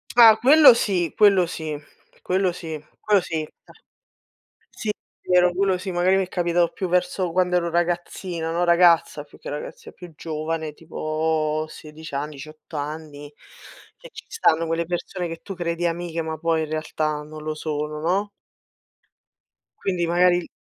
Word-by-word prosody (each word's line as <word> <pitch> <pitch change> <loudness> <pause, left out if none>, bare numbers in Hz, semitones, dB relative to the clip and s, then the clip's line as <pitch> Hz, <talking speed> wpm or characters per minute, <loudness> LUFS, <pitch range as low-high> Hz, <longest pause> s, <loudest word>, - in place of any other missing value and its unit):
Ah 225 -3 +9
quello 275 +1 +8
sì 180 -7 0
quello 200 -4 +5
sì 155 -2 -5 0.5
quello 185 0 +1
sì 160 -3 -7 0.2
quello 205 -3 +3
sì, 160 -2 -3 0.2
cioè. - - -20 0.9
Sì, 220 - -7
è 210 - -8
vero, 180 0 +5
quello 190 -1 +1
sì, 190 +1 -5
magari 180 +2 +3
mi 195 - +2
è 185 - -12
capitato 175 -1 +1
più 185 - -3
verso 180 0 0
quando 180 0 +2
ero 170 -1 0
ragazzina, 175 0 -2
no, 170 +2 0
ragazza 170 -3 +4
più 145 - -18
che - - -10
ragazz 145 +1 -7
più 180 -2 -12
giovane 155 -1 -4
tipo 155 -1 -2
16 155 0 -11
anni, 150 +2 -3
18 155 +3 -10
anni, 145 0 -6 0.6
che - - -13
ci - - -10
stanno 165 - +2
quelle 165 +1 -1
persone 175 +1 -4
che 165 0 -7
tu 195 - -7
credi 175 -1 -2
amiche, 170 0 -2
ma 160 0 -4
poi 165 0 +1
in 155 - -4
realtà 155 -1 -2
non 155 +1 -10
lo 155 0 -3
sono, 150 0 -4
no? 190 +6 0 1.5
Quindi 180 -3 -1
magari 175 0 +3
170 Hz, 160 wpm, -23 LUFS, 155-180 Hz, 1.5 s, Ah